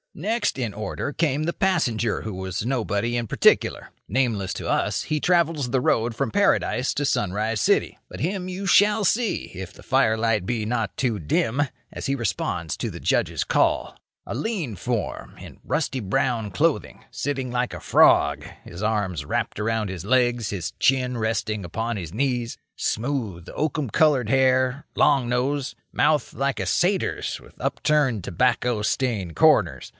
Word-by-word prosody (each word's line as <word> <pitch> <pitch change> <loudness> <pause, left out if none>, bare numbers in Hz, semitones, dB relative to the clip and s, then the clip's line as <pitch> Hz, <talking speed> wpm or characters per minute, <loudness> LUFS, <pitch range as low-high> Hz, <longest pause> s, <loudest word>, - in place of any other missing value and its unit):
Next 220 - -1
in 115 -6 -2
order 110 +7 -4
came 150 -2 0
the 170 +2 -1
passenger 120 - 0
who 110 - -5
was 95 +2 -4
nobody 120 -2 -1
in 120 -1 -1
particular. - - +2 0.2
Nameless 115 -8 0
to - - -5
us, - - 0
he 155 -1 -1
travels 165 -6 +2
the 130 +1 +1
road 115 -1 +1
from 130 -1 -1
Paradise 140 -9 +2
to 145 - 0
Sunrise 105 -1 0
City. - - +2
But - - -9
him 185 +2 -2
you 185 +2 -5
shall 205 +3 +4
see, 230 +3 0
if 95 0 -7
the - - -16
firelight 110 -3 +2
be 115 0 -1
not 110 -4 -2
too 120 -5 0
dim, 110 - 0 0.3
as - - -5
he 135 - +1
responds 90 - -2
to - - -3
the - - -8
Judge's - - 0
call. - - +1 0.3
A - - -5
lean 155 - -2
form, - - -4
in - - -12
rusty 140 -4 -1
brown 115 0 0
clothing, 90 - -1
sitting 135 -2 -3
like 125 0 -1
a - - -6
frog, 75 0 +4 0.2
his 85 +4 -8
arms 100 -8 -1
wrapped 75 - -2
about 110 0 0
his 95 -3 -6
legs, 120 0 +2
his 90 -5 -3
chin 125 -2 +1
resting 110 -2 -1
upon 115 +7 -3
his 85 -5 -6
knees. 120 -1 -1 0.2
Smooth, 110 -8 -2
oakum 150 -3 -1
coloured 145 -4 +3
hair; 130 +1 +2
long 135 -5 +3
nose; 130 +2 -1 0.2
mouth 150 -4 +2
like 140 0 -1
a - - -1
satyr's, 185 +1 0
with - - -17
upturned, 135 - +1
tobacco 120 +3 +1
stained 105 - -1
corners. - - +3
120 Hz, 160 wpm, -24 LUFS, 105-140 Hz, 0.3 s, shall